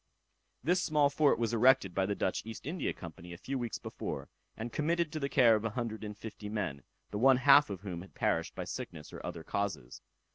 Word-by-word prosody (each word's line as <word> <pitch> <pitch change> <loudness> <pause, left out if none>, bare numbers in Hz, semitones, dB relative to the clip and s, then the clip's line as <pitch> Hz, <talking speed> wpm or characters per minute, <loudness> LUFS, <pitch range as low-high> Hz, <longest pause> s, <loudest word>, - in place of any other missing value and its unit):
This 180 +6 +2
small 150 -4 +3
fort 145 0 +3
was 115 -1 -1
erected 115 -5 +4
by 95 +1 +1
the 100 - -1
Dutch 95 - -1
East 115 +2 -8
India 155 +1 -2
Company 85 +1 -9
a - - -8
few 135 +8 -4
weeks 120 -2 -3
before, - - -6 0.3
and 115 +1 -5
committed 165 +1 +1
to 155 - -3
the 140 -1 -1
care 120 -5 +6
of 105 - 0
150 110 -2 -5
men, 95 -10 -3 0.3
the 105 - -2
one 130 +2 +6
half 140 +1 +7
of 95 -3 -5
whom 90 -4 -5
had 95 - -14
perished - - 0
by - - -3
sickness 75 - -7
or - - -8
other 80 - -5
causes. 80 -12 -3
115 Hz, 205 wpm, -32 LUFS, 100-140 Hz, 0.3 s, half